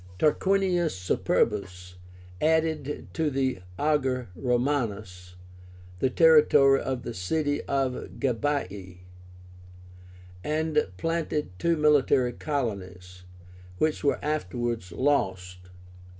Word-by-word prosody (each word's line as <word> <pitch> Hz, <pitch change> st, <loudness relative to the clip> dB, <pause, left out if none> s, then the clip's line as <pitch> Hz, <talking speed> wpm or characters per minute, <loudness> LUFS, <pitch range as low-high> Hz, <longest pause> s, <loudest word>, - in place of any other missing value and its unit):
Tarquinius 180 Hz, -, +1 dB
Superbus 90 Hz, 0 st, -1 dB, 0.5 s
added 155 Hz, -2 st, 0 dB
to 160 Hz, -2 st, 0 dB
the 130 Hz, -5 st, -1 dB, 0.2 s
AGER 130 Hz, -6 st, 0 dB
ROMÁNUS 110 Hz, -8 st, -2 dB, 0.6 s
the 130 Hz, -, +2 dB
territory 150 Hz, -2 st, +5 dB
of 130 Hz, -2 st, -3 dB
the 120 Hz, -, -5 dB
city 145 Hz, -, -1 dB
of 135 Hz, -2 st, -2 dB
GABII, 105 Hz, -8 st, -2 dB, 1.4 s
and 155 Hz, +1 st, 0 dB
planted 165 Hz, -, -2 dB
two 170 Hz, -1 st, +1 dB
military 140 Hz, -4 st, +3 dB
colonies, 90 Hz, -, -5 dB, 0.5 s
which 155 Hz, +5 st, 0 dB
were 140 Hz, -, +2 dB
afterwards 120 Hz, -, -2 dB
lost. 90 Hz, -9 st, -1 dB
130 Hz, 85 wpm, -27 LUFS, 100-150 Hz, 1.4 s, territory